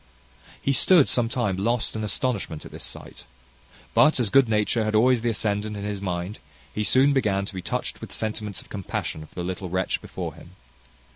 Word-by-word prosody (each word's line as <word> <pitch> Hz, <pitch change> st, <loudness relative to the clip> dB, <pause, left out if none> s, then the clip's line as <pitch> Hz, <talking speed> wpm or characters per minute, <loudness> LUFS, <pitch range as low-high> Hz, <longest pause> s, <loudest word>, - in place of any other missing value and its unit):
He 140 Hz, -, +1 dB
stood 165 Hz, +1 st, +6 dB
some 120 Hz, -2 st, +3 dB
time 110 Hz, -6 st, -1 dB
lost 115 Hz, +4 st, 0 dB
in 110 Hz, -, -3 dB
astonishment 105 Hz, -7 st, -2 dB
at -, -, -10 dB
this -, -, -6 dB
sight; -, -, -7 dB, 0.7 s
but, 155 Hz, -2 st, +5 dB
as 115 Hz, -5 st, +1 dB
good 135 Hz, -4 st, +5 dB
nature 110 Hz, +1 st, +1 dB
had 110 Hz, 0 st, -1 dB
always 120 Hz, +2 st, +4 dB
the 120 Hz, -, +1 dB
ascendant 105 Hz, 0 st, -1 dB
in 100 Hz, -, -5 dB
his 100 Hz, -1 st, -4 dB
mind, 90 Hz, +2 st, -3 dB, 0.3 s
he 105 Hz, -, -1 dB
soon 130 Hz, +7 st, +5 dB
began 100 Hz, -7 st, +1 dB
to 100 Hz, -, -8 dB
be 95 Hz, -, -5 dB
touched -, -, -3 dB
with -, -, -8 dB
sentiments 105 Hz, -2 st, -3 dB
of -, -, -21 dB
compassion 85 Hz, -5 st, -4 dB
for -, -, -26 dB
the 90 Hz, -, -3 dB
little 90 Hz, +1 st, -4 dB
wretch 95 Hz, +1 st, -1 dB
before -, -, -6 dB
him. -, -, -15 dB
105 Hz, 200 wpm, -25 LUFS, 95-120 Hz, 0.7 s, stood